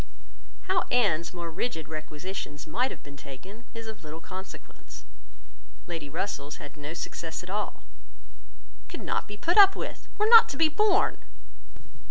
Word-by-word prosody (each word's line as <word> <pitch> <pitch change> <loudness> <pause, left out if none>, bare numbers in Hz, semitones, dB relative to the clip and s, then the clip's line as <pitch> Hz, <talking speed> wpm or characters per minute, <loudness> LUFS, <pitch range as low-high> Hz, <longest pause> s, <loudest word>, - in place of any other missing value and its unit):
How 370 -2 +1
Anne's 175 -9 +2
more 170 -2 -5
rigid 165 -3 -3
requisitions 155 0 -6
might 245 +12 +1
have - - -9
been 140 0 -11
taken 185 - -11
is 230 0 -6
of 220 -5 -8
little 155 +1 -7
consequence. 190 +2 -10 0.8
Lady 165 -4 -5
Russell's 160 -3 -3
had 145 - -10
no 150 +2 -6
success 165 0 -5
at 180 - -8
all: 210 +1 -3 1.1
could - - -7
not - - -1
be 205 -1 -7
put 345 - +4
up 390 -1 +9
with, - - -6
were 425 - +3
not 460 0 +10
to 275 - -4
be 320 -1 +5
borne. 405 +5 +3
185 Hz, 155 wpm, -28 LUFS, 155-245 Hz, 1.1 s, not